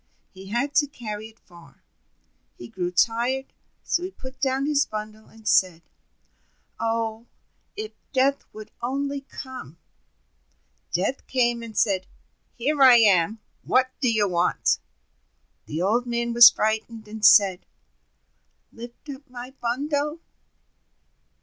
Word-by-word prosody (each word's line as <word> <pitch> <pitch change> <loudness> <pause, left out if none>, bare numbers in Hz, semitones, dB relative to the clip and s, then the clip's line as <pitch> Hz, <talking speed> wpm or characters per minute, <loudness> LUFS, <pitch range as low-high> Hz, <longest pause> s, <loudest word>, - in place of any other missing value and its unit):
He 190 0 -12
had 240 +8 -1
to 290 - +4
carry 220 -5 -7
it 225 0 -20
far. 170 -1 -19 0.7
He 120 - -9
grew 175 +6 -3
tired, 235 +8 0 0.3
so 345 - 0
he 365 - -4
put 260 -7 -12
down 270 0 +1
his 290 -1 +2
bundle, 215 0 -8
and 220 -1 -14
said: 175 -3 +2 1.0
"Oh, 225 0 -2 0.5
if 430 +1 -6 0.2
Death 275 +1 +2
would 215 0 -11
only 275 +3 -2
come!" 260 - -10 1.1
Death 200 +10 -2
came, 240 -2 +1
and 230 -2 -9
said: 190 -3 +1 0.5
"Here 280 +4 -1
I 260 -2 +9
am, 210 -2 +3 0.2
what 255 0 +2
do 250 -4 +2
you 215 -2 +2
want?" 175 -1 +1 0.9
The 160 +4 -3
Old 235 +6 +1
Man 235 0 -1
was 240 0 +10
frightened, 220 0 -2
and 215 0 -9
said: 200 -3 +5 1.1
"Lift 235 +5 -12
up 280 +1 -9
my 250 +1 -9
bundle!" 285 +6 -2
235 Hz, 125 wpm, -24 LUFS, 215-265 Hz, 1.1 s, was